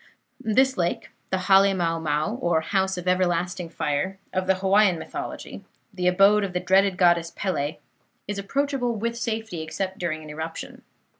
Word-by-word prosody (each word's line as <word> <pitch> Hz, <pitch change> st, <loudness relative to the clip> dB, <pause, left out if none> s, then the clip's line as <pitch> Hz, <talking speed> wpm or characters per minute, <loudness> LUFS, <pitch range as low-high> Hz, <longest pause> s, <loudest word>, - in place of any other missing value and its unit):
"This 260 Hz, +5 st, +3 dB
lake 175 Hz, -1 st, -1 dB, 0.2 s
the 190 Hz, -, 0 dB
Hale 195 Hz, +1 st, +5 dB
mau 165 Hz, -2 st, 0 dB
mau, 155 Hz, +5 st, -1 dB
or 170 Hz, -7 st, +1 dB
'House 190 Hz, +2 st, 0 dB
of 180 Hz, 0 st, -6 dB
everlasting 180 Hz, -1 st, 0 dB
Fire', 165 Hz, +4 st, -2 dB, 0.2 s
of 185 Hz, 0 st, -1 dB
the 190 Hz, -, +4 dB
Hawaiian 190 Hz, 0 st, +3 dB
mythology, -, -, -7 dB, 0.3 s
the 180 Hz, -2 st, -1 dB
abode 195 Hz, +3 st, +5 dB
of 190 Hz, -2 st, -3 dB
the 180 Hz, -, 0 dB
dreaded 190 Hz, +1 st, +3 dB
goddess 175 Hz, -2 st, +3 dB
Pele 155 Hz, -5 st, -2 dB, 0.5 s
is 205 Hz, 0 st, -3 dB
approachable 265 Hz, +2 st, -1 dB
with 230 Hz, +2 st, -2 dB
safety, 225 Hz, -6 st, -3 dB
except 190 Hz, +5 st, -4 dB
during 155 Hz, -3 st, -3 dB
an 150 Hz, -, -9 dB
eruption. 160 Hz, +2 st, -6 dB
185 Hz, 160 wpm, -25 LUFS, 170-200 Hz, 0.5 s, Hale